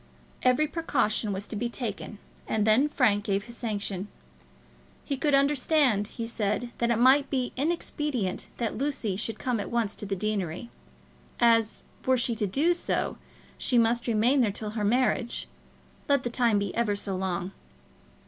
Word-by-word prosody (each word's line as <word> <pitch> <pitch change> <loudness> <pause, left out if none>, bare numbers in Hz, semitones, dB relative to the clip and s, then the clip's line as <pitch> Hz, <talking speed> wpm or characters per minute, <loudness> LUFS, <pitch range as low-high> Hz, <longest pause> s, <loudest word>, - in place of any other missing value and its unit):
Every 255 +4 +4
precaution 275 -9 0
was 195 +1 -4
to - - -5
be 235 +3 -1
taken, 230 -3 -5 0.3
and 215 -1 +1
then 235 +7 +4
Frank 215 -8 +2
gave 200 -1 0
his 235 +1 -10
sanction. 205 -4 -3 1.0
He 280 - -1
could 280 +1 +2
understand, 275 -6 +3
he 230 +1 -5
said, 230 +1 -2
that 235 - +1
it 235 - +3
might 265 +4 +5
be 255 -2 -1
inexpedient 290 - -1
that 230 -2 -2
Lucy 270 -8 -1
should 215 +3 -4
come 250 -3 -1
at 200 - -4
once 230 -3 0
to 205 - -4
the 195 - -1
deanery, 200 +1 -3 0.7
as, 230 -2 +3 0.2
were 260 0 +3
she 240 0 +1
to 210 -2 -1
do 295 - +2
so, 345 - -2 0.4
she 250 - +1
must 235 +1 +2
remain 235 +5 +3
there 220 -4 +2
till 210 +1 -5
her 215 -1 -3
marriage, 240 +2 +1 0.6
let 280 -2 +3
the 240 - -2
time 235 -3 +3
be 200 -2 -1
ever 230 -3 +1
so 200 -1 -3
long. 185 -1 -2
235 Hz, 165 wpm, -27 LUFS, 205-255 Hz, 1.0 s, might